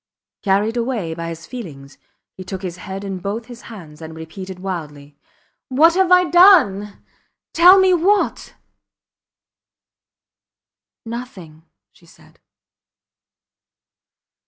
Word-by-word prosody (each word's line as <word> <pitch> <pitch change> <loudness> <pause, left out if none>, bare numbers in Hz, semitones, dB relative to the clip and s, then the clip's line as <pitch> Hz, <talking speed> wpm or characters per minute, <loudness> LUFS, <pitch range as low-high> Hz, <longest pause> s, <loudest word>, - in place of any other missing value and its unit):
Carried 205 +3 0
away 230 -9 -3
by 165 0 -6
his 165 0 -9
feelings 145 - -10 0.3
he 185 - -10
took 190 +1 -7
his 180 -2 -6
head 195 +2 -8
in 195 -2 -5
both 205 +5 -5
his 240 -1 -12
hands 165 -8 -12
and 160 0 -9
repeated 185 +4 -9
wildly: 150 -6 -7 0.5
What 310 +6 +4
have 375 0 +1
I 360 0 +6
done?... 300 - +4 0.5
Tell 360 +3 +7
me! 380 -1 +4
What?... 390 +4 0 2.5
Nothing, 190 -10 -9 0.3
she - - -24
said. - - -22
195 Hz, 110 wpm, -19 LUFS, 170-260 Hz, 2.5 s, Tell